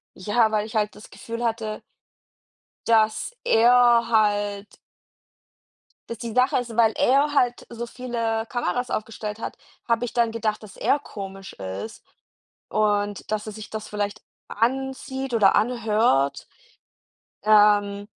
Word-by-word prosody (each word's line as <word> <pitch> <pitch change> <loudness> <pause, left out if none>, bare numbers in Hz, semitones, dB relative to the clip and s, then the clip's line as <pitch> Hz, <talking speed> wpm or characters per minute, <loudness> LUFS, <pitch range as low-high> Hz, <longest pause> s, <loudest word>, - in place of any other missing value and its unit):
ja, 220 +3 +1
weil 215 -1 0
ich 220 - -10
halt 210 -1 0
das 210 - -13
Gefühl 230 +1 -7
hatte 220 -2 -2 1.1
dass 220 - +2
er 240 - +5
halt 205 -2 +1 1.3
dass 230 - -6
die 230 0 -6
Sache 255 +1 +3
ist, 240 -2 -5
weil 225 -2 +4
er 285 +3 +3
halt 245 -3 +1
so 235 0 -6
viele 230 -2 -3
Kameras 245 0 -2
aufgestellt 215 -1 -4
hat, - - -5 0.3
habe 230 +1 +1
ich 230 - -5
dann 235 -1 +2
gedacht, 220 -2 -2
dass 210 - -12
er 290 - +2
komisch 195 -6 -9
ist 95 - -7 0.7
und 205 -1 0
dass 215 0 -1
er 215 - -7
sich 215 +1 -9
das 215 -1 -6
vielleicht 205 -1 -3 0.3
ansieht 265 +2 -2
oder 205 -4 +4
anhört. 215 - +1 1.0
Ähm 205 -1 +4
220 Hz, 130 wpm, -24 LUFS, 210-240 Hz, 1.3 s, er